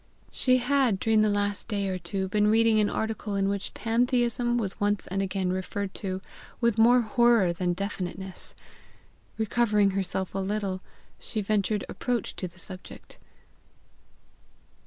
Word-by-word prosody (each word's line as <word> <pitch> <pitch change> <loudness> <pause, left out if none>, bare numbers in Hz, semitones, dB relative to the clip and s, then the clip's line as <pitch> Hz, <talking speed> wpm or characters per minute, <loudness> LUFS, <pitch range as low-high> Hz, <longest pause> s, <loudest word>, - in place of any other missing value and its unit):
She 255 -1 +3
had, 255 -4 +2
during 220 +1 +3
the 215 - +3
last 205 0 -1
day 200 -3 -1
or 185 -1 -2
two, 190 +2 -3
been 210 +2 +2
reading 225 0 +4
an 210 - +3
article 220 -2 -3
in 195 0 +1
which 200 0 -3
PANTHEISM 240 +1 +1
was 205 -5 -2
once 205 -1 0
and 195 +2 -2
again 190 -1 -1
referred 190 +1 -3
to 190 -1 -4 0.4
with 235 -2 +1
more 245 +2 +6
horror 230 -5 +3
than 175 +1 0
definiteness. 190 -1 -5 0.8
Recovering 215 -2 +2
herself 190 -1 -2
a 195 - -2
little, 195 -1 -2 0.4
she 220 - -4
ventured 205 0 0
approach 245 -4 -2
to 185 - -3
the 175 +1 -17
subject. 185 0 -9
205 Hz, 145 wpm, -27 LUFS, 190-225 Hz, 0.8 s, more